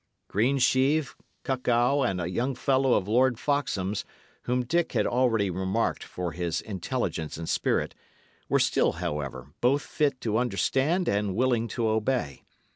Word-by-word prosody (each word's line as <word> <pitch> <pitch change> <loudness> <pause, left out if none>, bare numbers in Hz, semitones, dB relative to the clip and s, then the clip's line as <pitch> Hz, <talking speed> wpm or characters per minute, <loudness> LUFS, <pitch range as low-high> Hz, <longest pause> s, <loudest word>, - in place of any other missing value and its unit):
Greensheve, 130 +5 +2 0.3
Cuckow, 130 +1 +1
and 95 -8 0
a 90 - -2
young 120 +10 -1
fellow 130 0 +2
of 95 - 0
Lord 125 +2 +3
Foxham's 110 -9 -1 0.4
whom 125 0 0
Dick 170 +6 0
had - - +2
already 115 -6 +2
remarked 95 +5 -1
for 90 -2 -5
his 85 0 -2
intelligence 95 - -3
and 80 0 -6
spirit, - - 0 0.6
were - - +4
still, - - +2
however, 70 -2 -5
both 140 +5 +3
fit 145 -4 0
to 110 0 0
understand 130 - +1
and 100 -2 0
willing 120 -1 +1
to 115 +1 -1
obey. 110 - -1
120 Hz, 140 wpm, -27 LUFS, 95-130 Hz, 0.6 s, were